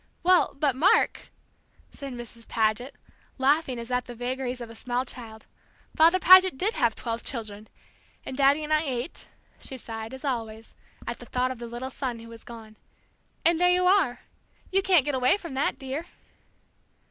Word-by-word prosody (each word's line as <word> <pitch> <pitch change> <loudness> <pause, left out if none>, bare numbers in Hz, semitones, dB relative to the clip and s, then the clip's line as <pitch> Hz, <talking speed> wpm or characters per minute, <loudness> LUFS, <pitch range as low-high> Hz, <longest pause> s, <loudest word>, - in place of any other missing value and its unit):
"Well, 365 0 +4
but, 280 -4 +2
Mark 325 +9 +3 0.3
" - - -41 0.3
said 275 -2 -8
Mrs. 240 -1 -10
Paget, 225 +4 0 0.4
laughing 275 -1 +2
as 235 +1 -7
at 250 0 0
the 245 - -9
vagaries 250 +1 -3
of 235 -1 -8
a - - -10
small 245 +2 -2
child, 225 -3 -10 0.5
"Father 330 +3 +6
Paget 370 -4 +7
did 410 +9 0
have 235 -2 +1
twelve 230 -1 -4
children 215 -4 -4 0.6
and 265 - -5
Daddy 280 +2 +3
and 305 +1 -1
I 305 - +4
eight 265 -1 -4 0.2
" - - -35
she 265 - -6
sighed, 225 0 -7
as 265 +3 -10
always, 225 -4 -4 0.3
at - - -5
the - - -11
thought 255 0 0
of 255 - -7
the 235 - -6
little 240 +3 -6
son 255 -3 -4
who 230 0 -12
was 230 -1 -12
gone, 220 -2 -12 0.7
"and 335 0 +3
there 360 - +6
you 360 0 +3
are! 360 -11 +3 0.5
You 390 +1 +3
can't 365 -7 +4
get 290 - -1
away 255 +7 +3
from 335 -8 -8
that, 270 +2 0
dear." 275 +5 -5
255 Hz, 185 wpm, -26 LUFS, 235-305 Hz, 0.7 s, Paget